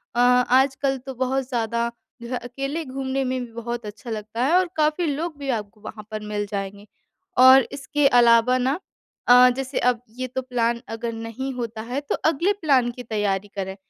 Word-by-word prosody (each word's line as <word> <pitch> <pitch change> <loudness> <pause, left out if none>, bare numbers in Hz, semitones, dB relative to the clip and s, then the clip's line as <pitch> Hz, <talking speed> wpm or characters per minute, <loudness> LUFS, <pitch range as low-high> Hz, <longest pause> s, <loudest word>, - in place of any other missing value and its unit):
अ, 240 - 0
आजकल 260 +2 +3
तो 265 - -4
बहुत 260 +1 -1
ज़्यादा 235 -1 -1 0.3
जो 235 - -8
है 250 - -1
अकेले 275 +6 -4
घूमने 265 0 -2
में 255 0 -1
भी 235 - -15
बहुत 235 0 -5
अच्छा 215 +3 -9
लगता 220 +2 -3
है 315 - +2
और 370 -2 +1
काफ़ी 310 +3 +1
लोग 305 +2 -3
भी 275 -1 -5
आपको 205 0 -10
वहाँ 215 -1 -9
पर 215 - -3
मिल 205 0 -2
जाएँगे। 200 +1 -5 0.5
और 260 +1 +9
इसके 280 +1 +1
अलावा 240 0 +5
ना 265 +7 0 0.5
अ, 250 +1 +8
जैसे 270 0 -2
अब 245 -1 +1 0.2
ये 255 - -2
तो 260 +1 -4
प्लान 235 -2 -1
अगर 230 +1 -4
नहीं 230 +4 -5
होता 230 -3 -5
है 245 +5 -3
तो 290 - -2
अगले 335 +6 +2
प्लान 265 -6 +3
की 250 +1 -9
तैयारी 205 -3 -1
करें। 190 -1 -4
250 Hz, 190 wpm, -23 LUFS, 230-270 Hz, 0.5 s, और